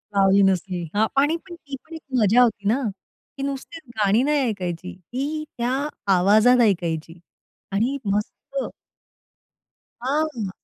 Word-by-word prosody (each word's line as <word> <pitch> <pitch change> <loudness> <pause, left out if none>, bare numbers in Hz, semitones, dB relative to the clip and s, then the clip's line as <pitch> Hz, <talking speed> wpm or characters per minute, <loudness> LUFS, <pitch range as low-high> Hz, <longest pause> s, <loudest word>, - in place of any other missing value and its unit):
लावली 195 0 +5
नसली. 180 -2 0
अ, 215 +2 +3 0.2
आणि 305 +3 +2
पण 345 - -8
तीच 285 0 -10
एक 320 - -7 0.2
मजा 220 +4 +5
होती 205 -4 +2
ना. 250 +6 +2 0.6
ती 275 - -4
नुसतीच 280 +4 -5 0.2
गाणी 210 +3 +3
नाही 295 0 +2
ऐकायची 180 -4 -4
ती. 275 - -4
त्या 240 +1 0 0.5
आवाजात 215 +7 +5
ऐकायची 170 -5 0 0.5
आणि 235 +8 +1
मस्त. 205 +1 -1 1.7
हां. 270 -6 -1
220 Hz, 125 wpm, -23 LUFS, 195-275 Hz, 1.7 s, लावली